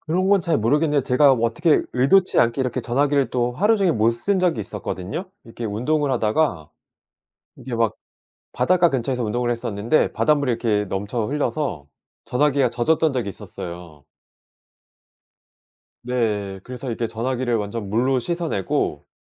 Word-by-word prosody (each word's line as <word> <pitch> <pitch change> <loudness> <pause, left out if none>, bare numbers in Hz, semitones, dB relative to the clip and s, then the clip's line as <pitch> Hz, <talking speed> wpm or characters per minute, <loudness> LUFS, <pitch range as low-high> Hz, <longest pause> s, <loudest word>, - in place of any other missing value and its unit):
그런 180 +4 0
건 200 -1 +4
잘 165 -2 +1
모르겠는데 145 +5 +2
제가 135 +2 +5
어떻게 120 +6 +2
의도치 180 +10 +3
않게 120 +3 +1
이렇게 125 0 -1
전화기를 140 +3 +1
또 125 -1 0
하루 210 - +2
종일 195 -5 +2
못 110 +1 +3
쓴 190 +12 0
적이 175 -11 +1
있었거든요. 105 - -5
이렇게 115 +1 -8
운동을 135 +7 0
하다가 110 - 0 0.9
이게 125 -3 -6
막 115 -1 +1 0.6
바닷가 180 -1 +3
근처에서 125 -2 -1
운동을 120 +3 -1
했었는데 115 +2 0
바닷물이 145 -3 +2
이렇게 110 -3 0
넘쳐 105 +4 -3
흘려서 145 - -2 0.4
전화기가 135 -1 +2
젖었던 155 +5 +1
적이 120 -6 -2
있었어요. 85 -4 -9 2.0
네. 105 -6 -1
그래서 125 +1 -7
이렇게 115 0 -2
전화기를 120 +2 -2
완전 105 0 -4
물로 125 +6 +1
씻어내고 160 - -2
125 Hz, 345 characters per minute, -22 LUFS, 110-150 Hz, 2.0 s, 제가